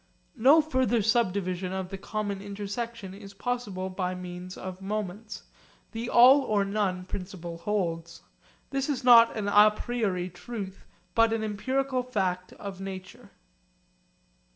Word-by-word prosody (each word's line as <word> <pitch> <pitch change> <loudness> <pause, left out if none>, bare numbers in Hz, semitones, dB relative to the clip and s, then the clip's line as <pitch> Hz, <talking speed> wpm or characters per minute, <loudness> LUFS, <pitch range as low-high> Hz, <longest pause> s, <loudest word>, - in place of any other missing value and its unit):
No 280 +7 +7
further 260 -7 +1
subdivision 190 -5 0
of 190 -1 -3
the 195 - -6
common 205 -1 -3
intersection 205 +1 -5
is 200 0 -11
possible 205 -4 -3
by 185 -1 -2
means 180 0 -7
of 185 0 -7
moments. 210 +1 -5 0.5
The 230 +1 -4
'all 260 +4 +8
or 210 -6 +1
none' 195 -3 -1
principle 180 -3 -6
holds. 170 -4 -2 0.5
This 275 +1 -1
is 270 -3 -1
not 235 -2 +7
an 210 - -2
à 210 +1 +6
priori 200 -8 -2
truth 195 0 -7 0.3
but 230 0 +4
an 225 -1 -1
empirical 260 +5 -1
fact 190 -7 -2
of 195 -1 -8
nature. 190 -1 -8
200 Hz, 130 wpm, -28 LUFS, 185-230 Hz, 0.5 s, all